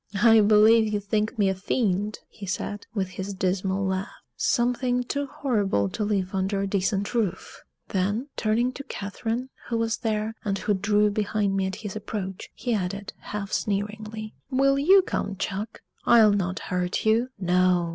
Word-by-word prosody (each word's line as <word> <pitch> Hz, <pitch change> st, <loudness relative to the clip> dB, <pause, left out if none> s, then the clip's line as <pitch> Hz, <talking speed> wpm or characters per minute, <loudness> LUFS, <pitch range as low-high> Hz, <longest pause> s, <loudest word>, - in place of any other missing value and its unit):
"I 225 Hz, -1 st, +8 dB
believe 215 Hz, +1 st, +5 dB
you 210 Hz, -, 0 dB
think 210 Hz, +2 st, -1 dB
me 205 Hz, -2 st, +3 dB
a 190 Hz, -, +2 dB
fiend!" 205 Hz, +1 st, -1 dB
he 200 Hz, -3 st, -10 dB
said, 205 Hz, +2 st, -4 dB
with 190 Hz, -3 st, -1 dB
his 190 Hz, +1 st, -5 dB
dismal 190 Hz, +1 st, 0 dB
laugh; 190 Hz, +1 st, -1 dB, 0.3 s
"something 245 Hz, 0 st, +1 dB
too 285 Hz, +3 st, -2 dB
horrible 205 Hz, -, 0 dB
to 210 Hz, -, -3 dB
live 195 Hz, -3 st, -1 dB
under 195 Hz, +1 st, 0 dB
a 200 Hz, -, 0 dB
decent 195 Hz, +1 st, 0 dB
roof!" 220 Hz, -7 st, -2 dB, 0.3 s
Then 205 Hz, +7 st, 0 dB
turning 230 Hz, +3 st, +1 dB
to 280 Hz, -, -8 dB
Catherine, 230 Hz, +3 st, -4 dB, 0.2 s
who 230 Hz, -, 0 dB
was 225 Hz, -1 st, 0 dB
there, 215 Hz, 0 st, -1 dB
and 200 Hz, -2 st, -1 dB
who 205 Hz, -, 0 dB
drew 205 Hz, +2 st, +2 dB
behind 205 Hz, -1 st, 0 dB
me 190 Hz, -1 st, +1 dB
at 190 Hz, -, -4 dB
his 205 Hz, -, -4 dB
approach, 200 Hz, -3 st, -5 dB
he 245 Hz, -, -2 dB
added, 200 Hz, 0 st, -3 dB
half 205 Hz, -1 st, -5 dB
sneeringly: 215 Hz, +1 st, -3 dB, 0.2 s
"Will 275 Hz, +1 st, +3 dB
you 375 Hz, +7 st, +6 dB
come, 200 Hz, -, -2 dB
chuck? 200 Hz, +3 st, -4 dB, 0.2 s
I'll 220 Hz, -3 st, +6 dB
not 185 Hz, -2 st, -1 dB
hurt 180 Hz, +1 st, -2 dB
you. 225 Hz, +3 st, +3 dB
No! 180 Hz, -2 st, +2 dB
210 Hz, 165 wpm, -26 LUFS, 195-225 Hz, 0.3 s, I